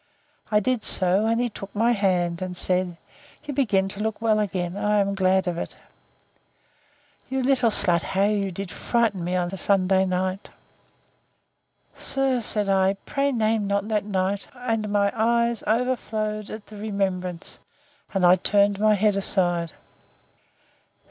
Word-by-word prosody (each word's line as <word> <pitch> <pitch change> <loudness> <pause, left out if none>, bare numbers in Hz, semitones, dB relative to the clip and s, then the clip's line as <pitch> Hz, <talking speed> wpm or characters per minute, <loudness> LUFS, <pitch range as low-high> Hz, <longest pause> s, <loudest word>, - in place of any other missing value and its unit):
I 210 - +4
did 250 +2 0
so, 190 +3 +1
and 230 +1 +1
he 245 - +1
took 200 -3 -9
my 230 +3 +3
hand, 180 -5 0
and 180 -1 -4
said, 180 -2 0 0.5
You 295 -1 -5
begin 210 -8 +2
to 195 - -6
look 220 0 -2
well 220 -1 +2
again: 185 -3 -2
I 210 +1 +1
am 200 0 +1
glad 190 0 +2
of 170 -1 -2
it. - - -5 1.5
You 265 0 -1
little 255 -3 +3
slut, 175 -5 +2
how 195 +3 0
did 195 -4 -1
you - - -9
frighten 225 -7 0
me 180 +1 -1
on 180 +1 -1
Sunday 190 0 +2
night. 185 +1 -2 1.4
Sir, 270 -2 0
said 210 -2 0
I, 195 0 +3
pray 280 0 0
name 220 -3 +1
not 200 +1 -1
that 210 -2 +1
night; 195 0 -1
and 225 -4 -2
my 200 -1 +2
eyes 235 0 +1
overflowed 215 -3 -1
at 215 -1 -8
the 210 - -12
remembrance, 190 -4 -3 0.5
and 190 -2 +1
I 180 +1 +7
turned 200 +1 +2
my 215 0 +4
head 205 0 +2
aside. 175 -4 0
200 Hz, 150 wpm, -24 LUFS, 185-220 Hz, 1.5 s, I